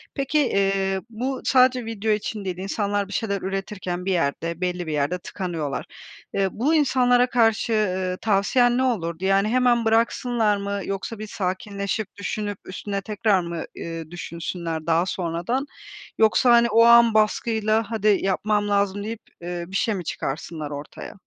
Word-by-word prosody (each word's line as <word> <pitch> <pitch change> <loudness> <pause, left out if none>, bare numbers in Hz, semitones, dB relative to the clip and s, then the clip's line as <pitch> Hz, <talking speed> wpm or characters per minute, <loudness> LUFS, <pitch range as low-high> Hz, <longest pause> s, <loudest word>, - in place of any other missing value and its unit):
Peki, 275 +2 +1
eee, 195 -6 +1
bu 255 +4 -3
sadece 255 -2 +4
video 220 -1 -2
için 210 -1 -2
değil, 180 -1 -3
insanlar 200 +1 -1
bir 200 - -8
şeyler 200 -3 -1
üretirken 190 -2 -4
bir 195 - 0
yerde 165 +1 -1
belli 180 -2 -2
bir 155 - -2
yerde 150 +5 0
tıkanıyorlar. 170 -7 -4 0.5
Eee, 195 -1 +1
bu 285 +8 +1
insanlara 250 -4 +3
karşı, 225 -1 +2
ııı, 185 -3 0
tavsiyen 240 +4 +3
ne 260 - +2
olurdu? 175 -8 -1
Yani 195 +2 +3
hemen 240 -1 +3
bıraksınlar 225 -1 +2
mı 200 0 -3
yoksa 195 +3 -4
bir 215 - -6
sakinleşip 200 +2 -3
düşünüp 205 0 -4
üstüne 200 +1 -4
tekrar 205 -1 +1
mı, 170 -1 -4 0.2
ııı, 165 -1 -6
düşünsünler 170 -1 -5
daha 165 +2 +3
sonradan? 185 - -2 0.5
Yoksa 225 +3 +4
hani 235 0 +5
o 230 +2 +5
an 235 -1 +7
baskıyla 215 0 +1 0.2
"Hadi, 215 -2 0
yapmam 205 +2 0
lazım!" 200 0 +1
deyip, 225 +1 -5 0.2
eee, 175 0 -4
bir 190 - -8
şey 215 +1 +1
mi 180 - -4
çıkarsınlar 155 0 -4
ortaya? 145 +1 -8
200 Hz, 155 wpm, -23 LUFS, 180-225 Hz, 0.5 s, an